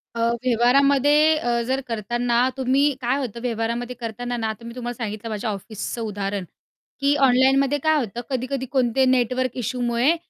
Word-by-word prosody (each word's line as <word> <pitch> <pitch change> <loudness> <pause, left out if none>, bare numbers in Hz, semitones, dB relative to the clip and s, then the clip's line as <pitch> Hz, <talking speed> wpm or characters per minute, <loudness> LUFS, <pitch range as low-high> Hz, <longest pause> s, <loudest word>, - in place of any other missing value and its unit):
अ, - - -4 0.2
व्यवहारामध्ये 275 +5 +4
अ, 240 -4 0
जर 265 +1 0
करताना 240 +3 0
तुम्ही 270 +3 +2
काय 250 +3 +1
होतं 235 -4 -5
व्यवहारामध्ये 235 +1 -2
करतांना 240 +1 -4
ना, 225 - -2
आता 220 +2 -6
मी 235 - -7
तुम्हाला 240 -1 -4
सांगितलं 215 +1 -5
माझ्या 215 +1 -3
ऑफिसचं 215 +3 -5
उदाहरण, 200 -2 -3 0.6
की 285 +1 +3
ऑनलाईनमध्ये 270 +1 +4
काय 315 +2 +2
होतं 235 -2 -4
कधी-कधी 260 +1 -2
कोणते 260 0 +1
नेटवर्क 255 0 +1
इश्यूमुळे 245 - +1
245 Hz, 150 wpm, -23 LUFS, 230-265 Hz, 0.6 s, व्यवहारामध्ये